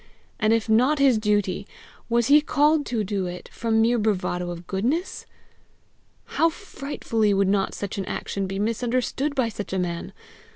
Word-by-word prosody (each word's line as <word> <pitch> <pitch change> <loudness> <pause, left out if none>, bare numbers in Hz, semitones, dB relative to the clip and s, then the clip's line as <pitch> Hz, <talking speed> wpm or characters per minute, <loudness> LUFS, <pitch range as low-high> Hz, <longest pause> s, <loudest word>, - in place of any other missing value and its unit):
And 215 -2 +2
if 225 -1 +2
not 250 +7 +3
his 270 -5 +4
duty, 205 -2 0 0.4
was 235 0 +2
he 290 +4 +6
called 295 0 +2
to 230 -3 -1
do 195 -2 -2
it 180 0 -8
from 225 -1 +1
mere 235 +1 +2
bravado 180 -4 -1
of 175 0 -7
goodness? 255 - -2 1.0
How 330 - +2
frightfully 275 - -2
would 195 0 +2
not 195 0 +1
such 200 0 -4
an 195 - -3
action 195 +1 -3
be 195 +1 -4
misunderstood 245 +6 -1
by 255 -4 +1
such 205 -3 -6
a - - 0
man! 175 -2 -3
220 Hz, 165 wpm, -24 LUFS, 195-255 Hz, 1.0 s, he